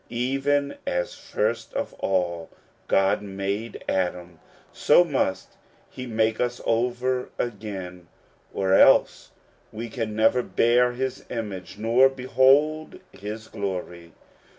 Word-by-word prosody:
Even 135 +4 0
as 90 0 -1
first - - -3
of - - -3
all 85 -3 -1 0.4
God 95 +1 +2
made 100 +3 -4
Adam, 90 -2 -2 0.3
so 160 +4 +5
must 135 - -2 0.3
he 130 -1 -7
make 110 -1 0
us 125 0 -1
over 125 +2 0
again, 95 -6 -5 0.4
or 95 -1 0
else - - +5 0.4
we 115 +2 -6
can 110 -2 -4
never 110 +3 +3
bear 125 +1 +2
his 130 +1 -4
image 100 -6 -6
nor 115 +5 +4
behold 135 +4 +2
his 105 +2 -8
glory. 90 -4 -5
115 Hz, 110 wpm, -25 LUFS, 95-125 Hz, 0.4 s, so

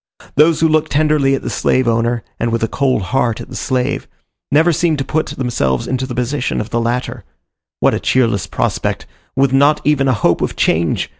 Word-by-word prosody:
Those 155 +2 +3
who 165 - +5
look 155 -1 +1
tenderly 150 -2 +2
at - - -6
the - - -3
slave 130 -1 +1
owner, 115 +1 0 0.2
and 115 0 -1
with 115 0 -1
a - - +2
cold 130 -4 0
heart 125 -4 +1
at - - -9
the - - -9
slave, 125 -1 -2 0.4
never 160 +4 +4
seem 160 0 +1
to 135 - -3
put 155 +3 -1
themselves 110 - -1
into 130 0 -2
the 125 - -6
position 125 +2 -1
of 105 - -5
the 115 - 0
latter; 120 +2 -2 0.6
what - - +3
a - - -1
cheerless 115 -7 +1
prospect, - - -2 0.3
with 135 0 +2
not 140 +3 +4
even 140 -2 +2
a 130 - +3
hope 95 -5 +1
of - - -2
change! 80 0 +1
130 Hz, 205 wpm, -17 LUFS, 115-145 Hz, 0.6 s, who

